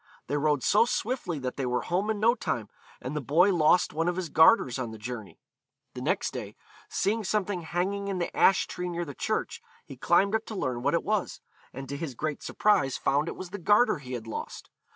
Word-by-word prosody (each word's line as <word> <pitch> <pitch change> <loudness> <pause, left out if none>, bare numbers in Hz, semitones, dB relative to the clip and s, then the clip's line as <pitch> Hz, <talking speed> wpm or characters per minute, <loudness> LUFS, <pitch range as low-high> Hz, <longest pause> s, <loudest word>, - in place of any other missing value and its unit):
They 145 - -2
rode 145 -3 +1
so 210 - +4
swiftly 240 - -2
that 130 -2 -4
they 135 - -1
were 125 0 -1
home 185 +4 -1
in 215 -1 -1
no 230 +3 +4
time, 115 - -3 0.3
and 130 +4 -5
the 150 - -1
boy 170 - +4
lost 170 +1 +3
one 165 +2 0
of 175 - 0
his 180 -3 -3
garters 160 - +5
in 125 -3 -3
the 110 - -9
journey. 110 -1 -7 0.5
The - - -7
next - - 0
day, - - -7 0.3
seeing 220 +2 0
something 200 -2 -1
hanging 185 +4 -2
in 195 -2 -2
the 175 - -3
ash 195 - +4
tree 180 0 -5
near 175 0 -3
the 145 - -7
church, 215 +10 -2 0.2
he - - -10
climbed 200 +1 +2
up 220 0 0
to 220 - -6
learn 125 -9 -2
what - - +1
it - - 0
was, - - -1 0.3
and 135 +1 -8
to 140 - -5
his 145 -5 -5
great 150 +2 -3
surprise 135 -11 +1
found 145 +3 +1
it - - -4
was 185 -1 -8
the 205 - -5
garter 205 +1 +3
he 130 -2 -8
had 120 -3 -5
lost. 115 - -7
170 Hz, 225 wpm, -28 LUFS, 135-200 Hz, 0.5 s, garters